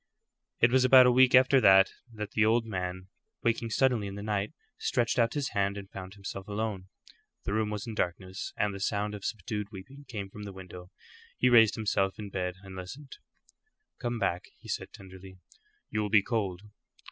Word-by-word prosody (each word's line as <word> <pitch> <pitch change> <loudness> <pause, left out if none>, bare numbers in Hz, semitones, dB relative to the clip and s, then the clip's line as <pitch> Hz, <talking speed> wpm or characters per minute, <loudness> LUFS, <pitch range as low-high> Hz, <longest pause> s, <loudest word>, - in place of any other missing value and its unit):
It 115 - +5
was 130 0 +4
about 130 0 +8
a 125 - +6
week 130 +1 +6
after 130 +1 +6
that 95 -1 +6 0.4
the 110 - +2
old 115 +1 +3
man, 95 -3 -4 0.3
waking 115 0 0
suddenly 120 -3 +2
in 100 - -7
the 100 - -6
night, 105 -1 -1 0.3
stretched 120 0 0
out 115 +2 +2
his 145 -2 -1
hand 100 -1 0
and 100 -1 -9
found 95 0 -8
himself 100 -1 -7
alone. 105 -3 -3 0.6
The 100 - -3
room 110 0 0
was 105 -1 -4
in 115 - -6
darkness, 95 -1 -3
and 105 -1 0
the 100 - -7
sound 105 +1 -1
of 105 -2 -8
subdued 105 0 -3
weeping 125 +9 -11
came 100 -5 -6
from 105 - -10
the 100 -1 -7
window. 90 -1 -11 0.5
He 125 - +3
raised 115 -3 +6
himself 100 -3 0
in 105 -2 -7
bed 90 -1 -2
and 95 -1 -10
listened. 130 +10 -9 0.8
"Come 120 -1 -2
back," 95 -4 -1
he - - -14
said, - - -4
tenderly. 95 0 -13 0.5
"You 105 - 0
will 105 - -2
be 105 -2 +5
cold." 100 -6 -2
105 Hz, 190 wpm, -29 LUFS, 95-115 Hz, 0.8 s, about